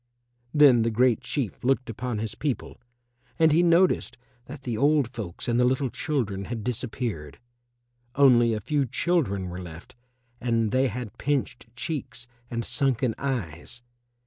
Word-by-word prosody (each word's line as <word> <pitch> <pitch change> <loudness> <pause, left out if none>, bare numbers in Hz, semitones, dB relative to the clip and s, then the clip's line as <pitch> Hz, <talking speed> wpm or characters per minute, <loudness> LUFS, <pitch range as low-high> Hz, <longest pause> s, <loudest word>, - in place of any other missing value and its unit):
Then 140 -6 +6
the 115 - +2
Great 120 +1 +2
Chief 130 -8 -3
looked 130 0 +1
upon 115 +1 -4
his 110 0 -3
people 145 -4 -4 0.6
and 160 -1 +5
he 160 +3 +4
noticed 175 +1 +3 0.3
that 135 +1 -10
the 120 -3 -3
old 145 +2 +3
folks 110 -8 -7
and 120 0 +1
the - - +4
little 130 0 +1
children 105 -11 -2
had 115 -1 -5
disappeared; 110 - -4 0.8
only 120 -5 +5
a - - -2
few 140 +5 0
children 120 - 0
were 90 +1 -6
left 85 -1 -10 0.5
and 115 -3 0
they 130 +3 +3
had 120 -2 -6
pinched 135 -4 -2
cheeks 140 -4 -5 0.2
and 115 -1 -3
sunken 125 -2 +1
eyes. 120 - -4
125 Hz, 145 wpm, -26 LUFS, 110-140 Hz, 0.8 s, Then